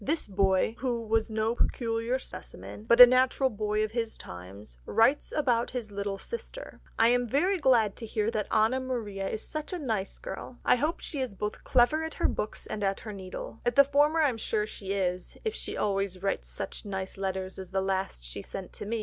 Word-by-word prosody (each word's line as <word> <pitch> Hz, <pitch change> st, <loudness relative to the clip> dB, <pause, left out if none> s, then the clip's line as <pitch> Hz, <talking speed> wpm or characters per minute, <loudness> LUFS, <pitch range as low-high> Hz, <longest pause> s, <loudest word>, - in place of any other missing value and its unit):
This 305 Hz, +4 st, 0 dB
boy, 195 Hz, +2 st, +2 dB
who 240 Hz, -3 st, -1 dB
was 220 Hz, 0 st, +1 dB
no 220 Hz, +1 st, 0 dB
peculiar 230 Hz, 0 st, 0 dB
specimen, 220 Hz, -4 st, -8 dB
but 235 Hz, +1 st, +4 dB
a 250 Hz, -, +15 dB
natural 255 Hz, +1 st, +3 dB
boy 210 Hz, 0 st, 0 dB
of 215 Hz, -, -2 dB
his 230 Hz, -1 st, -2 dB
times, 90 Hz, -3 st, -10 dB
writes 245 Hz, +6 st, +3 dB
about 245 Hz, -6 st, +1 dB
his 240 Hz, -4 st, -5 dB
little 200 Hz, 0 st, -3 dB
sister: 470 Hz, -, -8 dB, 0.2 s
"I 225 Hz, -, +5 dB
am 245 Hz, 0 st, +2 dB
very 355 Hz, -, +2 dB
glad 235 Hz, -8 st, +4 dB
to 225 Hz, -, -6 dB
hear 215 Hz, +1 st, 0 dB
that 215 Hz, -2 st, -1 dB
Anna 220 Hz, +4 st, +3 dB
Maria 215 Hz, -7 st, -3 dB
is 220 Hz, -, -3 dB
such 310 Hz, +4 st, -4 dB
a -, -, -1 dB
nice 220 Hz, -, -2 dB
girl. -, -, -7 dB
I -, -, +5 dB
hope 305 Hz, +7 st, -1 dB
she 290 Hz, -, -4 dB
is 250 Hz, -6 st, -3 dB
clever 240 Hz, +7 st, +2 dB
both -, -, -2 dB
at 320 Hz, -, -7 dB
her -, -, +2 dB
books 210 Hz, -, -3 dB
and 215 Hz, -1 st, -4 dB
at 195 Hz, 0 st, 0 dB
her 215 Hz, -, -7 dB
needle... 190 Hz, +3 st, -7 dB
at 240 Hz, 0 st, 0 dB
the 280 Hz, -, +9 dB
former 290 Hz, +3 st, +3 dB
I 300 Hz, -, +5 dB
am 230 Hz, -3 st, -4 dB
sure 215 Hz, -1 st, 0 dB
she 195 Hz, -2 st, -5 dB
is, 180 Hz, -2 st, -2 dB
if 440 Hz, -, 0 dB
she -, -, -5 dB
always 195 Hz, -2 st, -1 dB
writes 195 Hz, -, -1 dB
such -, -, -6 dB
nice 190 Hz, -2 st, -4 dB
letters 190 Hz, -1 st, -3 dB
as 190 Hz, -2 st, -7 dB
the 190 Hz, -, 0 dB
last 190 Hz, -, -2 dB
she -, -, -6 dB
sent 190 Hz, -, -7 dB
to -, -, -7 dB
me. 230 Hz, +1 st, -1 dB
220 Hz, 215 wpm, -29 LUFS, 195-255 Hz, 0.2 s, a